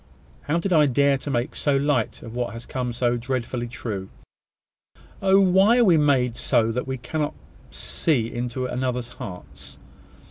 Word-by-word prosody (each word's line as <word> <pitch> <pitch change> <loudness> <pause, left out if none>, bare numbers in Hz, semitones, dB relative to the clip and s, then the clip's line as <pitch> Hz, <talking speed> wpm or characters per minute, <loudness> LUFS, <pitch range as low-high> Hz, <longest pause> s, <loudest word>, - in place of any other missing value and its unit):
How 150 +3 -1
did 180 +2 -1
I 150 -3 +5
dare 140 +1 +3
to 145 - -6
make 125 +1 -1
so 145 -2 +2
light 140 -5 0
of 115 0 -9
what 120 -3 -2
has 115 +1 -8
come 125 -2 -3
so 120 0 0
dreadfully 120 0 -3
true? 105 -5 -5 1.1
Oh! 195 0 +5
why 195 +4 +5
are 245 - +5
we 185 - +6
so - - +3
made 130 -5 +2 0.4
that 125 +3 -3
we 130 0 -3
cannot 150 +4 -3 0.3
see 120 -8 -1
into 120 +1 -3
one 125 - -3
another's 125 -1 -2
hearts? 70 -7 -10
125 Hz, 170 wpm, -24 LUFS, 120-145 Hz, 1.1 s, we